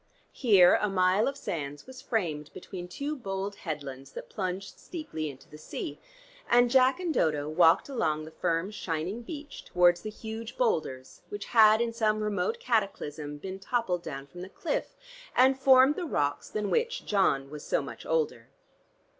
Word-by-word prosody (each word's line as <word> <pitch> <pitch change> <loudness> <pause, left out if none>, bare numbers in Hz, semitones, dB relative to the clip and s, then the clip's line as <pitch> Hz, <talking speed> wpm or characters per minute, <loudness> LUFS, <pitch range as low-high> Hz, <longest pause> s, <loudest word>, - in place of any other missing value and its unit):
Here 195 -8 +6
a 210 - +1
mile 185 +2 +3
of 275 0 -2
sands 145 - -5
was 260 0 -11
framed 160 - -2
between 180 -2 -7
two 285 +11 -4
bold 200 -4 -4
headlands 140 -4 -6
that - - -8
plunged 190 0 -4
steeply 235 - -5
into 135 -1 -12
the 150 - -13
sea, 150 -1 -6 0.5
and 245 0 +5
Jack 260 +3 +5
and 350 -3 -1
Dodo 150 - +1
walked 165 +1 +4
along 155 - -1
the 160 - -10
firm, 170 +3 -1
shining 180 +2 -3
beach 290 +3 -8
towards 175 -1 +3
the 215 - -5
huge 220 +1 -7
boulders 155 - -1
which 205 -1 -5
had 220 -1 +6
in 235 -1 -1
some 215 -2 +1
remote 200 -4 -1
cataclysm 155 -10 -2
been 190 +5 -7
toppled 195 -4 -1
down 135 -4 -6
from 175 +6 -11
the 185 - -7
cliff, 330 - -3 0.4
and 260 +1 +5
formed 265 +1 +6
the 365 - -3
rocks 145 - -1
than 210 -1 -2
which 470 0 0
John 145 -9 +1
was 150 -1 -8
so - - 0
much - - -8
older. 475 -2 -1
195 Hz, 170 wpm, -29 LUFS, 155-240 Hz, 0.5 s, Here